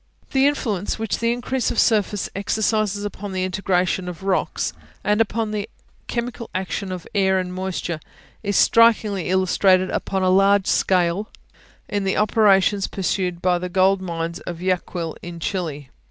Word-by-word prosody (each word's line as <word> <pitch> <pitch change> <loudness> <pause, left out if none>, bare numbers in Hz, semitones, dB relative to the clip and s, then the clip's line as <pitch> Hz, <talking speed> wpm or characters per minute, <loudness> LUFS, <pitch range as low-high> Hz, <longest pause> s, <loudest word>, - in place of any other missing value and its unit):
The 270 +1 +4
influence 215 -9 -1
which 225 -2 -2
the 230 0 +1
increase 245 +1 -1
of - - -3
surface 210 -3 +2
exercises 210 0 0
upon 205 -1 -6
the 185 - -1
disintegration 185 -1 0
of 180 +1 -9
rocks, 195 -1 0 0.3
and 210 +1 +2
upon 225 0 -1
the 210 -1 -3 0.4
chemical 235 -1 -4
action 185 +1 -3
of 180 -2 -6
air 190 -2 +3
and 180 -1 -2
moisture, 185 -3 -3 0.4
is 205 -2 0
strikingly 215 -5 +4
illustrated 185 0 +3
upon 190 -1 -1
a 185 - +3
large 195 +1 +4
scale 185 +3 +1 0.6
in 205 -1 -2
the 190 - 0
operations 205 -2 +3
pursued 180 -2 -2
in 180 -1 +2
the 180 - -3
gold 190 +1 +3
mines 170 -2 -4
of 175 -2 -7
Yaquil, 180 -2 -2
in 170 -1 -8
Chili. 155 -7 -4
190 Hz, 155 wpm, -22 LUFS, 180-210 Hz, 0.6 s, The